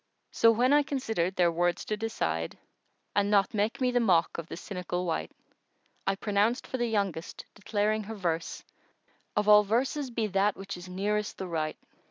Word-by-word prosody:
So 230 Hz, -, +5 dB
when 245 Hz, +4 st, +4 dB
I 295 Hz, -, +6 dB
considered 225 Hz, -11 st, -1 dB
their 175 Hz, -2 st, +3 dB
words 175 Hz, +2 st, 0 dB
to 215 Hz, -, -1 dB
decide, 80 Hz, -, -2 dB, 0.3 s
* -, -, -46 dB
And 205 Hz, 0 st, +2 dB
not 200 Hz, -2 st, +3 dB
make 215 Hz, +5 st, 0 dB
me 255 Hz, -1 st, +2 dB
the 245 Hz, -, +2 dB
mock 175 Hz, -8 st, +2 dB
of 165 Hz, -, -6 dB
the -, -, -7 dB
cynical 180 Hz, -2 st, -4 dB
wight; 80 Hz, -, -2 dB, 0.8 s
I 195 Hz, -, +2 dB
pronounced 210 Hz, +4 st, +1 dB
for 260 Hz, -, -4 dB
the 240 Hz, -, +1 dB
youngest, 200 Hz, -7 st, -2 dB
declaring 210 Hz, 0 st, -1 dB
her 225 Hz, +2 st, -6 dB
verse 170 Hz, -4 st, -2 dB, 0.4 s
* -, -, -40 dB
Of 210 Hz, -, +2 dB
all 210 Hz, 0 st, +9 dB
verses 260 Hz, +6 st, 0 dB
be 230 Hz, -2 st, -1 dB
that 200 Hz, 0 st, +1 dB
which 195 Hz, +1 st, -6 dB
is 175 Hz, +1 st, -10 dB
nearest 210 Hz, +3 st, -1 dB
the 190 Hz, -, -4 dB
right. 155 Hz, -2 st, -2 dB
205 Hz, 190 wpm, -29 LUFS, 180-225 Hz, 0.8 s, all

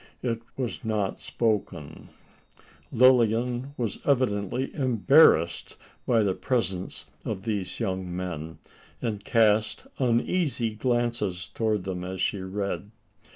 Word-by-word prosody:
It 115 Hz, -2 st, -1 dB, 0.2 s
was 125 Hz, -2 st, -3 dB
not 105 Hz, -4 st, -1 dB
spoken. 95 Hz, -9 st, -2 dB, 0.8 s
Lilian 125 Hz, +2 st, +3 dB
was 115 Hz, -4 st, -2 dB
evidently 125 Hz, -2 st, 0 dB
embarrassed 130 Hz, -, +4 dB, 0.3 s
by 115 Hz, -3 st, +4 dB
the 100 Hz, -2 st, +1 dB
presence 95 Hz, -6 st, -2 dB, 0.2 s
of 95 Hz, -, -4 dB
these 105 Hz, -4 st, -3 dB
young 95 Hz, -2 st, -2 dB
men; 80 Hz, -3 st, -5 dB, 0.4 s
and 105 Hz, -4 st, -3 dB
cast 110 Hz, -1 st, +2 dB
uneasy 125 Hz, -1 st, +1 dB
glances 120 Hz, -5 st, -1 dB
towards 110 Hz, -4 st, -1 dB
them 90 Hz, -1 st, -4 dB
as 95 Hz, +1 st, -5 dB
she 100 Hz, -, 0 dB
read. 100 Hz, +1 st, -4 dB
110 Hz, 110 wpm, -27 LUFS, 95-120 Hz, 0.8 s, embarrassed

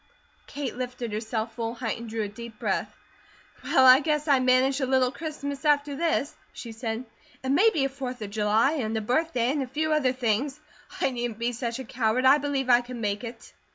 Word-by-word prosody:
Kate 280 Hz, -3 st, -5 dB
lifted 250 Hz, -2 st, -5 dB
herself 220 Hz, +1 st, -3 dB
full 230 Hz, 0 st, -4 dB
height, 230 Hz, -2 st, -3 dB
and 235 Hz, -1 st, -8 dB
drew 220 Hz, 0 st, -2 dB
a -, -, -2 dB
deep 225 Hz, +1 st, -10 dB
breath. -, -, -1 dB, 0.7 s
"Well, 265 Hz, -2 st, +4 dB
I 255 Hz, +1 st, +9 dB
guess 300 Hz, 0 st, -1 dB
I 280 Hz, -3 st, +5 dB
manage 255 Hz, +2 st, +3 dB
a 260 Hz, -, 0 dB
little 260 Hz, -1 st, +3 dB
Christmas 285 Hz, -2 st, -5 dB
after 290 Hz, -1 st, +2 dB
this," 320 Hz, -2 st, 0 dB, 0.2 s
she 235 Hz, -, -8 dB
said, 225 Hz, +1 st, -4 dB, 0.4 s
"and 265 Hz, +1 st, +1 dB
maybe 345 Hz, -4 st, +4 dB
a -, -, 0 dB
Fourth 260 Hz, -2 st, -6 dB
of 200 Hz, -, -7 dB
July, 215 Hz, +5 st, +2 dB
and 220 Hz, -1 st, -2 dB
a -, -, -1 dB
birthday, 250 Hz, +1 st, +1 dB
and 290 Hz, 0 st, -1 dB
a 265 Hz, -, -3 dB
few 310 Hz, +4 st, -1 dB
other 280 Hz, -4 st, +2 dB
things. 255 Hz, +3 st, -1 dB, 0.4 s
I 270 Hz, -, +2 dB
needn't 240 Hz, -3 st, -3 dB
be 235 Hz, +1 st, -1 dB
such 235 Hz, 0 st, -3 dB
a 265 Hz, -, -6 dB
coward. 235 Hz, +1 st, 0 dB
I 275 Hz, +3 st, +7 dB
believe 275 Hz, -2 st, -1 dB
I 245 Hz, -1 st, +6 dB
can 245 Hz, 0 st, -8 dB
make 205 Hz, -1 st, -2 dB
it." 235 Hz, 0 st, -9 dB
255 Hz, 210 wpm, -26 LUFS, 230-275 Hz, 0.7 s, I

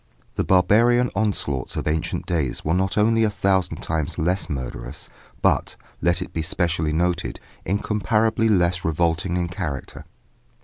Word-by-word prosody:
The -, -, -1 dB
barbarian 115 Hz, +7 st, +4 dB
onslaughts 100 Hz, -11 st, -1 dB
of -, -, -3 dB
ancient 75 Hz, +1 st, -1 dB
days 75 Hz, -8 st, -2 dB
were 80 Hz, -, +1 dB
not 95 Hz, +2 st, 0 dB
only 115 Hz, +2 st, +3 dB
a 110 Hz, -, +3 dB
thousand 95 Hz, -2 st, 0 dB
times 80 Hz, -3 st, -2 dB
less 90 Hz, +1 st, 0 dB
murderous, 65 Hz, -5 st, -6 dB, 0.3 s
but, -, -, +2 dB, 0.3 s
let 85 Hz, +1 st, +2 dB
it -, -, -13 dB
be 80 Hz, -, -1 dB
specially 80 Hz, -1 st, 0 dB
noted, 85 Hz, +2 st, -1 dB, 0.3 s
incomparably 105 Hz, +3 st, +1 dB
less 90 Hz, -3 st, +2 dB
revolting 85 Hz, +2 st, 0 dB
in 90 Hz, -1 st, 0 dB
character. 85 Hz, -7 st, -5 dB
90 Hz, 140 wpm, -23 LUFS, 80-100 Hz, 0.3 s, barbarian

